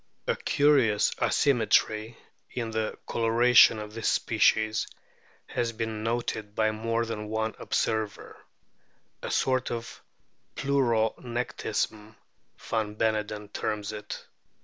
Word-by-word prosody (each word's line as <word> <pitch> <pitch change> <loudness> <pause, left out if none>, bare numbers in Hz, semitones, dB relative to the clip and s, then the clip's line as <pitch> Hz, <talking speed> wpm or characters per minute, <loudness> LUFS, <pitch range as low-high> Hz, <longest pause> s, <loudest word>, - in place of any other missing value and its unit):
A - - +1
curious 135 -8 +3
asymmetry 110 -3 +2 0.3
in 115 -2 -4
the 110 -1 -2
coloration 115 0 +5
of 105 0 -7
this 115 -1 -1
species 110 0 +2 0.6
has 115 -1 -2
been 110 -1 -3
noted 110 -2 -2
by 110 -1 +2
more 115 +2 -1
than 110 -2 -5
one 110 +1 -1
observer 110 -3 -2 0.4
" - - -41
a - - -5
sort 130 -1 +1
of 115 -1 -6 0.5
pleuronectism," 120 -4 -1 0.4
van 110 -2 -3
Beneden 105 -1 -1
terms 105 -1 -2
it. 105 -1 -7
110 Hz, 105 wpm, -28 LUFS, 110-115 Hz, 0.6 s, coloration